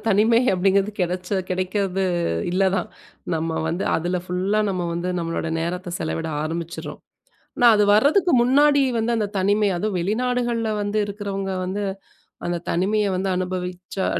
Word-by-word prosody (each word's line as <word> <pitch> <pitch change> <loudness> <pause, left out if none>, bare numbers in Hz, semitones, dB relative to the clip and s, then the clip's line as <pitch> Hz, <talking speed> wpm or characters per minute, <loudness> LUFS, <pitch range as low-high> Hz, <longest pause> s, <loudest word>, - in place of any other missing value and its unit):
தனிமை 220 +3 +4
அப்படிங்கிறது 195 +2 +2
கிடச்ச, 180 0 -2 0.2
கெடைக்கிறது 190 +1 -1 0.5
இல்ல 190 +2 +2
தான். - - -2 0.5
நம்ம 160 0 -2
வந்து 170 +3 -2
அதுல 175 +3 -1
ஃபுல்லா 190 +4 0
நம்ம 180 -2 -2
வந்து 170 +1 -2
நம்மளோட 165 -1 -2
நேரத்தை 175 +2 -3
செலவிட 160 0 -2
ஆரம்பிச்சிடுறோம். 165 +1 -5 0.6
ஆனா, 245 - +4
அது 210 - +4
வரதுக்கு 310 - +4
முன்னாடி 285 +3 +4 0.2
வந்து 230 +2 0
அந்த 215 -2 0
தனிமை 205 +2 +2
அதுவும் 205 +2 -1
வெளிநாடுகள்ல 240 +3 0
வந்து 205 +1 -1
இருக்குறவங்க, 200 -1 -4
வந்து 190 +3 -3 0.6
அந்த 175 0 -1
தனிமையை 200 +4 +1
வந்து 190 +1 -1
அனுபவிச்சா, 180 +1 -3
195 Hz, 135 wpm, -22 LUFS, 180-215 Hz, 0.6 s, தனிமை